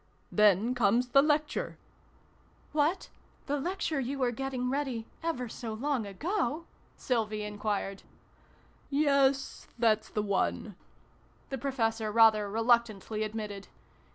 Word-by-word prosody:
Then 210 +3 +4
comes 240 +1 +2
the 275 +2 +6
Lecture 300 +1 0 0.5
" - - -33
What? 330 +6 0 0.4
The 290 0 -1
Lecture 335 -2 -2
you 270 +2 -2
were 255 -2 +1
getting 260 0 -3
ready 265 -5 -2 0.2
ever 325 -7 -2
so 225 0 -6
long 260 -2 -1
ago? 315 - -2 0.2
" - - -34
Sylvie 215 -4 -1
enquired. 205 -1 -3 0.5
" - - -32
Yes 280 -2 +2
that's 220 -2 +2
the 210 - -1
one," 200 0 -1 0.8
the 270 - -2
Professor 225 -5 -1
rather 215 -2 +5
reluctantly 225 -1 +1
admitted. 210 -2 -4
235 Hz, 125 wpm, -30 LUFS, 215-275 Hz, 0.8 s, the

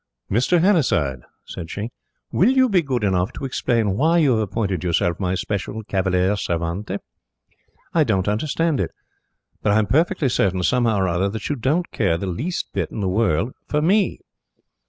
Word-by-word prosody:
"Mr. 125 - +3
Hannasyde," 125 - +2 0.2
said 85 -3 -7
she, 105 +6 -5 0.4
"will 195 - +4
you 260 0 +4
be 190 -4 +3
good 130 -7 -2
enough 95 -2 +1
to - - -6
explain 115 -6 0
why 160 +9 +3
you 150 -5 +4
have 115 - +2
appointed 100 -4 -2
yourself 85 0 0
my 95 -1 0
special 100 +3 -3
cavalier 95 -1 +1
servente? 90 +2 -2 1.0
I 165 - +4
don't 95 -8 0
understand 150 +7 0
it. - - 0 0.7
But 105 - +2
I - - +4
am 110 - +3
perfectly 145 - +2
certain, 95 -5 +1
somehow 115 0 +2
or 95 -1 +1
other, 90 +3 0
that 110 +1 -5
you 145 - 0
don't 145 +8 0
care 95 -7 +1
the 100 - -4
least 130 - -3
little - - -1
bit - - -11
in 110 - -3
the 95 - 0
world 100 +2 +1
for 150 - 0
ME." 190 +5 +2
105 Hz, 180 wpm, -22 LUFS, 95-145 Hz, 1.0 s, will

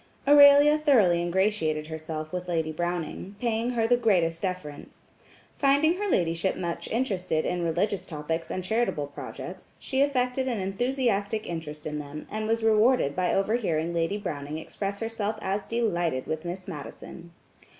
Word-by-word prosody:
Aurelia 290 +1 +8
thoroughly 215 - +4
ingratiated 175 -4 0
herself 155 0 -6
with 180 0 -4
Lady 160 -2 -1
Browning, 175 +3 -4
paying 230 0 0
her 230 -2 +1
the 245 +2 +4
greatest 175 -8 +2
deference. 180 -6 -6 0.5
Finding 285 +5 +3
her 410 +1 -2
ladyship 170 - +1
much 170 -2 -4
interested 190 -9 -1
in 180 0 -1
religious 180 +3 -1
topics 160 +1 -4
and 185 - -3
charitable 220 -7 0
projects, 145 - -9
she 265 -1 -1
affected 260 -2 +1
an 240 -3 -1
enthusiastic 215 0 -1
interest 155 -3 -6
in 150 -1 -3
them, 150 +1 -7
and 215 0 -3
was 225 0 0
rewarded 220 - +3
by 180 -1 +1
overhearing 195 -6 0
Lady 170 +4 0
Browning 155 -7 -5
express 200 +5 -5
herself 225 -1 -2
as 195 0 -1
delighted 175 - 0
with 155 +1 -4
Miss 180 +3 -5
Madison. 170 +1 -9
190 Hz, 150 wpm, -27 LUFS, 165-230 Hz, 0.5 s, Aurelia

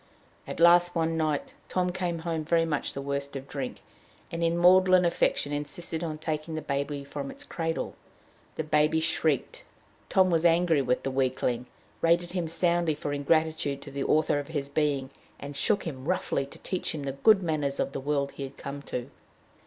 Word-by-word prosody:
At - - -6
last 175 +1 +6
one 165 0 +1
night 155 -3 -1 0.2
Tom 180 -1 0
came 175 -2 -2
home 165 -2 -1
very 165 +1 +2
much 150 -3 -2
the 140 - -5
worse 140 0 -2
of 135 0 -6
drink, 135 -2 -5 0.5
and 165 0 -2
in 165 0 +2
maudlin 185 +1 +6
affection 170 -3 +1
insisted 155 +3 -3
on 155 -2 -3
taking 155 0 -3
the 155 - -3
baby 140 0 -2
from 140 0 -6
its 290 - -7
cradle. 165 - -3 0.6
The 160 - -2
baby 150 +1 +3
shrieked. 160 -3 0 0.5
Tom 185 -1 +4
was 165 -1 +2
angry 170 -3 +4
with 125 -1 0
the 135 - -1
weakling, 125 -2 0 0.3
rated 170 +1 +3
him 175 -2 -2
soundly 170 -1 +1
for 145 -1 -4
ingratitude 145 -1 +1
to 140 - -9
"the 140 0 -3
author 155 -1 +2
of 145 - -6
his 145 -4 -3
being," 140 -3 0 0.3
and 145 0 -7
shook 210 +7 +1
him 135 -6 -6
roughly 170 -6 0
to - - -10
teach 185 -3 -3
him 145 - -5
the 140 - -2
good 195 +9 +4
manners 150 -4 -1
of - - 0
the 135 - -4
world 140 0 0
he - - -10
had 135 -1 -6
come 140 +1 -6
to. 125 +2 -4
155 Hz, 190 wpm, -28 LUFS, 140-170 Hz, 0.6 s, last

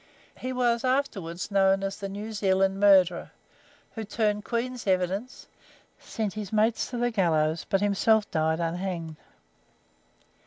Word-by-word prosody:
He 255 - -4
was 240 -2 +1
afterwards 205 -10 -2
known 195 0 +3
as 195 +1 -4
"The 200 -1 -5
New 210 +3 -6
Zealand 195 -1 +1
Murderer," 190 -4 +4 0.6
who 225 - -6
turned 210 0 -1
Queen's 240 0 -3
evidence, 190 +6 -1 0.5
sent 215 -3 -4
his 210 -3 -6
mates 220 +1 +1
to 245 - -5
the 240 0 0
gallows, 160 -6 +1
but 195 - +1
himself 205 +1 +2
died 160 -2 0
unhanged. 170 -1 -3
200 Hz, 130 wpm, -27 LUFS, 185-225 Hz, 0.6 s, Murderer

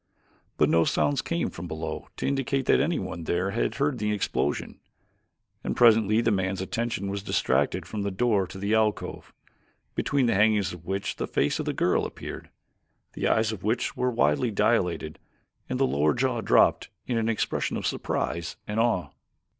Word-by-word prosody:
But - - +4
no 85 0 +4
sounds 140 - +1
came 170 0 -2
from 85 +1 -7
below 80 -1 -5
to - - -3
indicate 135 -1 0
that - - +4
anyone 95 - -2
there 90 +4 0
had 115 - -1
heard 140 -3 0
the 105 0 0
explosion, 105 -2 -2 0.8
and - - -2
presently 110 -2 +5
the 115 - +2
man's 95 -1 0
attention 115 +1 -2
was 100 0 -3
distracted - - 0
from 105 - -5
the 100 - -1
door 100 -1 +1
to 95 - -10
the 100 +3 -1
alcove, 110 -1 0 0.6
between 140 -2 +1
the 115 - +2
hangings 105 -2 +3
of 85 -1 -12
which 95 +1 -2
the - - -3
face - - 0
of - - -2
the - - 0
girl - - +1
appeared. - - -8 0.6
The - - -1
eyes 110 0 +2 0.4
were 125 0 +1
widely 115 -2 +2
dilated 90 -7 0 0.5
and 130 - -2
the 135 - +4
lower 75 - +2
jaw 125 -2 0
dropped - - +3 0.2
in 120 -3 0
an 115 0 0
expression 110 - -1
of - - -4
surprise 85 0 -2
and 105 +1 -2
awe. 100 -10 +1
105 Hz, 170 wpm, -26 LUFS, 95-120 Hz, 0.8 s, presently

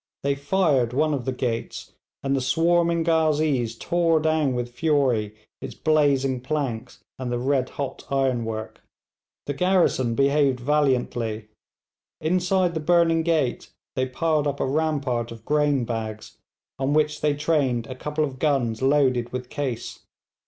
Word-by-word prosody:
They 140 0 +2
fired 140 -4 +1
one 155 +3 +2
of 130 -4 -3
the 130 - 0
gates, 120 -3 -4 0.3
and 135 0 +1
the 135 - 0
swarming 170 +4 +2
ghazees 155 -7 +1
tore 170 +1 +2
down 155 -4 +1
with 120 0 -3
fury 125 -8 +1 0.3
its - - -7
blazing 140 -4 +2
planks 130 -4 -4 0.2
and 125 -2 -3
the 120 - 0
red 130 +1 0
hot 140 -2 -6
ironwork. 120 -5 -2 0.6
The 145 - -2
garrison 145 -7 +2
behaved 140 0 +2
valiantly. 120 -6 0 0.7
Inside 180 +2 +1
the 160 - -2
burning 165 0 +3
gate 160 -6 0 0.3
they 130 0 0
piled 150 +3 0
up 140 0 -2
a - - +1
rampart 140 -5 -1
of 115 -1 -11
grain 145 -4 +2
bags, 110 -2 -5 0.4
on 135 +2 0
which 150 0 +1
they 150 -1 +2
trained 140 -6 0
a 130 - -7
couple 150 +4 -2
of 135 -3 -4
guns 135 -7 0
loaded 130 -3 +2
with 125 0 -5
case. 135 -5 -4
140 Hz, 145 wpm, -24 LUFS, 125-155 Hz, 0.7 s, burning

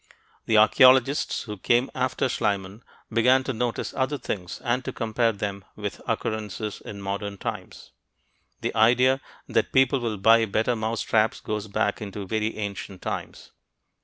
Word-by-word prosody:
The 110 - +4
archeologists 130 +5 +5
who 105 -3 -7
came 120 +6 +2
after 130 +1 0
Schliemann 100 -2 -2 0.3
began 125 +4 +4
to 130 - -3
notice 120 +1 -2
other 135 +2 -1
things 90 -8 -5
and 125 +2 0
to - - -4
compare 115 0 0
them 100 -2 -5
with 105 -1 -5
occurrences 105 -1 -3
in 100 -1 -8
modern 100 +1 -4
times. - - -7 0.7
The - - -2
idea 125 +4 +4 0.3
that - - 0
people 135 0 +4
will 115 -3 -2
buy 115 +3 +5
better 110 +4 0
mousetraps 110 0 0
goes 105 0 -4
back 105 +1 -1
into 100 -1 -6
very 110 +2 -2
ancient 100 -2 -6
times. - - -6
110 Hz, 145 wpm, -25 LUFS, 105-125 Hz, 0.7 s, archeologists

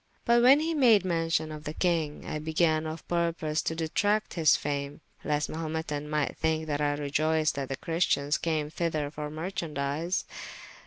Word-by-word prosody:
But 235 0 +5
when 265 +5 +7
he 320 - -1
had 325 - -1
made 225 -7 +5
mention 165 -2 0
of 150 -1 -8
the 150 +1 -5
kyng, 165 -5 0
I 155 - -3
began 160 0 +1
of 155 +1 -7
purpose 170 -3 0
to 160 - -2
detracte 205 +7 0
his 160 -3 +4
fame, 140 -1 -4 0.2
lest 150 0 0
the - - -8
Mahumetan 155 -2 -3
might 150 -1 -1
thinke 160 0 0
that 150 -1 -2
I 145 0 +1
reioyced 155 +2 +1
that 140 -2 -4
the 135 - -3
Christians 155 -4 0
came 155 -2 -1
thyther 155 -3 -2
for 150 -1 -5
merchandies. 155 0 -2
155 Hz, 175 wpm, -28 LUFS, 150-170 Hz, 0.2 s, when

